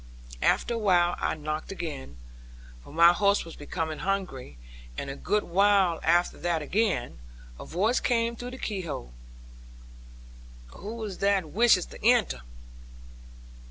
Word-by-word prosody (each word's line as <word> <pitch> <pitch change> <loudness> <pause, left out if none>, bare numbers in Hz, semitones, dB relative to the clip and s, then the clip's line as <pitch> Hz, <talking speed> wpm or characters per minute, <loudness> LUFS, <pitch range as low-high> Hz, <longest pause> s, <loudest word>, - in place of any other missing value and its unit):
After 240 - +2
a - - -1
while 175 -4 +3
I - - -1
knocked 155 +2 -4
again, 150 - -6 0.7
for - - -14
my 170 +3 +6
horse 200 +1 +2
was 165 - -10
becoming 160 +1 -4
hungry; 190 - -3 0.4
and 140 - -4
a - - -6
good 210 +7 0
while 190 -1 +3
after 175 +2 +2
that 170 -3 -1
again, 180 - -1 0.4
a - - -8
voice 210 +9 +1
came 235 -1 0
through 245 +2 -7
the 255 - -8
key 205 -6 -3
hole, 100 - -6 1.6
'Who 225 +2 -6
is 200 -4 -6
that 195 -5 +1
wishes 225 -4 +4
to - - -13
enter?' 230 - +3
185 Hz, 140 wpm, -27 LUFS, 160-210 Hz, 1.6 s, my